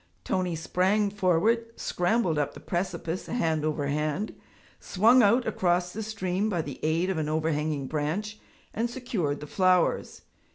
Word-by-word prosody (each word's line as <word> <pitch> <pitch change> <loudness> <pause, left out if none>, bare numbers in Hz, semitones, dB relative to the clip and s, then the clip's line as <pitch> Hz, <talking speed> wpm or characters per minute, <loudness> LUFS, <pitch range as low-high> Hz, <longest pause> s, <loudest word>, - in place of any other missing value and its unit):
Tony 180 -2 -1
sprang 190 +5 +1
forward, 210 +5 +1
scrambled 175 -3 +1
up 145 -1 -2
the - - -9
precipice 175 -1 -3
hand 160 -9 0
over 155 -2 -1
hand, 150 +7 -1 0.5
swung 230 +7 +4
out 235 +4 +4
across 180 -4 0
the 220 - -4
stream 205 -2 -2
by 180 -5 -1
the 145 -4 -5
aid 165 +4 +1
of 175 - -2
an 150 -1 -2
overhanging 155 -2 -1
branch, 160 +10 -3 0.3
and 230 +2 -1
secured 200 - -2
the - - -6
flowers. 185 +2 +1
180 Hz, 150 wpm, -27 LUFS, 155-210 Hz, 0.5 s, swung